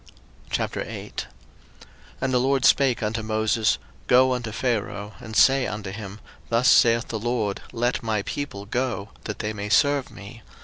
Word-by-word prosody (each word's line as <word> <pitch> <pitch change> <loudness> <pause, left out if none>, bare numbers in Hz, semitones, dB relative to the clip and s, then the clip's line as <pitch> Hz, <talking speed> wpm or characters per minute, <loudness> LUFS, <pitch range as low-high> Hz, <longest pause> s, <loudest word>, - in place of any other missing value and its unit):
02:008:001 - - -4 1.0
And 130 -1 0
the 125 - +4
LORD 135 +1 +2
spake 135 -4 +4
unto 110 +1 -1
Moses, 110 0 +1 0.3
Go 130 +1 +5
unto 120 -3 -3
Pharaoh, 105 -3 -2
and 110 -3 -9
say 135 +1 +5
unto 105 -2 -5
him, 100 0 -8 0.3
Thus 120 +2 +3
saith 115 -2 +5
the 110 - -3
LORD, 110 -3 -1
Let 120 +1 0
my 110 -3 -1
people 100 -8 -5
go, 115 -3 -2 0.2
that 105 - -4
they 105 0 -3
may 105 0 -5
serve 140 +3 +3
me. 105 +3 -11
115 Hz, 150 wpm, -24 LUFS, 105-125 Hz, 1.0 s, Go